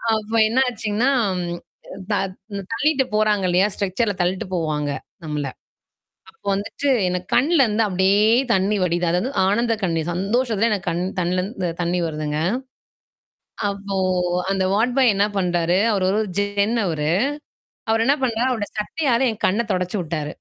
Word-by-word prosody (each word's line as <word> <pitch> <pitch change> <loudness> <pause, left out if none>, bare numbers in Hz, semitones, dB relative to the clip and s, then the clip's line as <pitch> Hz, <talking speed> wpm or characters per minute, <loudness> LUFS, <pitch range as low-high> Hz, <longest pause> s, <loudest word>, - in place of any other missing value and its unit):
அப்ப 215 +1 -5 0.2
என்னாச்சுங்கன்னா 235 -1 +1 1.0
த - - +2 0.4
இந்த 200 0 -4
தள்ளிட்டு 280 +3 +2
போறாங்க 210 -3 +2
இல்லையா? 185 +3 +3
ஸ்ட்ரக்சர்ல 200 +2 -1
தள்ளிட்டு 185 +4 -1
போவாங்க 150 -3 -1 0.4
நம்மள. 150 -2 -3 0.8
அப்போ - - -36
வந்துட்டு 205 +8 -3 0.2
எனக்கு 180 0 -3
கண்லருந்து 255 -7 +3
அப்படியே 190 +2 +3 0.3
தண்ணீ 195 +2 +1
வடிது. 175 0 +1
அதாவது 180 +10 0 0.2
ஆனந்த 230 +3 +2
கண்ணி 165 -3 0
சந்தோஷத்துல 220 +4 +1
எனக்கு 195 -3 -2
கண் 170 +2 -1 0.2
கண்ணலந்து 180 +1 -1
தண்ணீ 175 +1 0
வருதுங்க. 150 -1 -3 1.3
அப்போ 200 -1 -4 0.5
அந்த 190 -1 +1
வாட்பாய் 245 +1 +3
என்ன 200 +1 +3
பண்றாரு? 175 -1 +1
அவரு 190 -3 +1
ஒரு 205 - +1
ஒரு 210 - -3
ஜென் 205 +3 0
அவரு. 155 -2 -1 0.8
அவர் 225 0 +3
என்ன 280 +2 +4
பண்ணறாரு 240 +1 +1
அவரோட 215 -5 -2
சட்டையால 255 +1 0
என் 220 - -10
கண்ண 205 +5 +1
தொடைச்சு 180 +2 -1
விட்டாரு. 155 -3 -3
200 Hz, 135 wpm, -22 LUFS, 180-225 Hz, 1.3 s, என்ன